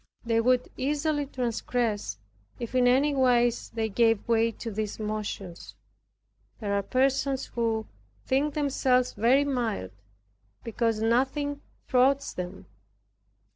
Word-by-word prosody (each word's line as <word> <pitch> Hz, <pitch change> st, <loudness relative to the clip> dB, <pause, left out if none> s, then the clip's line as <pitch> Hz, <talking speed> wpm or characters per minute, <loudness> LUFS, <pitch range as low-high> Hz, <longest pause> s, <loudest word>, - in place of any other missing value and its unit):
They 230 Hz, -1 st, +2 dB
would 250 Hz, +1 st, +2 dB
easily 290 Hz, +1 st, 0 dB
transgress, 235 Hz, -, -2 dB, 0.4 s
if 235 Hz, +1 st, -5 dB
in 250 Hz, -1 st, +4 dB
any 275 Hz, +4 st, +3 dB
wise 245 Hz, -3 st, +2 dB
they 225 Hz, -1 st, -2 dB
gave 225 Hz, 0 st, +2 dB
way 230 Hz, 0 st, +3 dB
to 230 Hz, -, -6 dB
these 215 Hz, 0 st, -4 dB
motions. 210 Hz, -4 st, -5 dB, 0.8 s
There 205 Hz, -2 st, -2 dB
are 200 Hz, -, +2 dB
persons 265 Hz, +3 st, +1 dB
who 225 Hz, -2 st, 0 dB, 0.4 s
think 285 Hz, +3 st, +1 dB
themselves 260 Hz, -4 st, +1 dB
very 245 Hz, +7 st, +3 dB
mild 235 Hz, -, -2 dB, 0.7 s
because 230 Hz, -1 st, -1 dB
nothing 270 Hz, +5 st, 0 dB, 0.3 s
thwarts 270 Hz, +2 st, +2 dB
them. 180 Hz, 0 st, -6 dB
240 Hz, 115 wpm, -27 LUFS, 220-265 Hz, 0.8 s, in